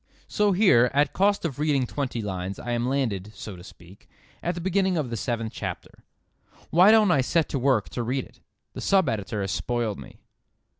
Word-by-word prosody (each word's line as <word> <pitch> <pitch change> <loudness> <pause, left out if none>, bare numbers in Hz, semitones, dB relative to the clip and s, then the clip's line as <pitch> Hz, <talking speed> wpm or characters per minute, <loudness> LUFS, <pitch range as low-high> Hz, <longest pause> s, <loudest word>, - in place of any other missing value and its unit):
So 210 -1 +1
here, 180 - +5
at 145 +1 +2
cost 200 0 +2
of 140 -5 -4
reading 145 -4 +1
twenty 125 -3 -4
lines, 95 -1 -4
I 120 - -5
am 120 +1 0
landed, 110 -7 -2
so 105 -2 -8
to 90 - -12
speak, 90 +1 -16 0.3
at 175 0 -2
the - - -5
beginning 190 0 +1
of 140 -6 -2
the - - -2
seventh 115 -2 -3
chapter. - - -7 0.7
Why 180 +5 +6
don't 215 -3 +5
I 140 - +3
set 160 +5 +1
to 140 - -2
work 125 -5 +2
to 120 - -4
read 125 +3 -2
it? - - -21 0.3
The - - -7
sub 190 -5 +3
editor 105 -2 -2
has 95 0 -2
spoiled 120 -4 -2
me. - - -12
130 Hz, 200 wpm, -25 LUFS, 110-170 Hz, 0.7 s, Why